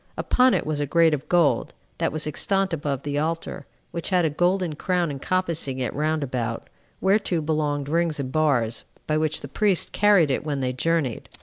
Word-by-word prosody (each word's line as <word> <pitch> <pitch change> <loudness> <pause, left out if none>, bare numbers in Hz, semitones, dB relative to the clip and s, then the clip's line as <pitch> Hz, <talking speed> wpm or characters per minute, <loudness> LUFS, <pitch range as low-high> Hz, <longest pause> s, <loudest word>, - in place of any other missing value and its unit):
Upon 255 0 +3
it - - -1
was 155 -1 -1
a 145 - -1
grate 165 +1 +4
of 150 -1 -4
gold, 175 -4 +2 0.2
that - - +1
was 155 0 -2
extant 195 +5 0
above 145 -4 -2
the 145 0 -1
altar, 165 +2 -3 0.2
which 170 -1 -4
had 180 -3 +3
a 155 - +1
golden 175 +1 +1
crown 175 +1 -1
encompassing 160 -2 -1
it 125 -2 -2
round 155 +1 0
about, 120 -4 -4 0.3
whereto 190 -3 +2
belonged 150 -2 -1
rings 165 0 0
and 130 -2 -3
bars, 130 -8 +1 0.2
by 155 - 0
which 155 0 -1
the - - -7
priests 195 +5 +1
carried 200 -8 +4
it 130 - -1
when 145 -2 -2
they 130 -1 -1
journeyed. 145 -3 -1
155 Hz, 190 wpm, -24 LUFS, 145-170 Hz, 0.3 s, grate